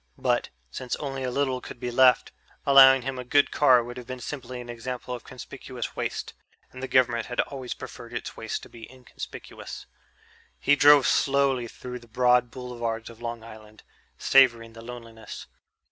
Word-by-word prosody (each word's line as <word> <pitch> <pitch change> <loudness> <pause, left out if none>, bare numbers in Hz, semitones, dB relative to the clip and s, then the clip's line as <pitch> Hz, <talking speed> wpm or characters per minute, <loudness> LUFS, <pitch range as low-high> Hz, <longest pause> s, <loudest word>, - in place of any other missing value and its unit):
But, - - 0 0.2
since 125 - -4
only 135 -2 -5
a 130 - -1
little 130 -1 -1
could - - -10
be 125 -1 -3
left, 125 0 +4 0.3
allowing 135 -2 +8
him 130 0 -4
a - - -4
good 145 +3 +3
car 130 -5 +5
would 120 +1 -8
have 125 -2 -9
been 130 0 -6
simply 125 -2 -6
an 120 - -8
example 125 +1 -6
of 120 - -7
conspicuous 130 -1 -8
waste, - - -4 0.4
and 130 - -10
the 130 - -3
government 120 -3 +2
had 125 - -5
always 130 -3 -6
preferred - - -10
its - - -5
waste - - -5
to - - -12
be 115 0 -12
inconspicuous. 130 -1 -9 0.7
He 145 - +3
drove 145 -1 +7
slowly 135 -3 +2
through 125 +2 -8
the 120 - -18
broad 125 +1 +3
boulevards 120 -2 -5
of 115 0 -16
Long 115 -1 -5
Island, 110 -1 -13 0.3
savoring 120 -4 +4
the 115 - -11
loneliness. 115 -2 -9
125 Hz, 175 wpm, -26 LUFS, 120-130 Hz, 0.7 s, allowing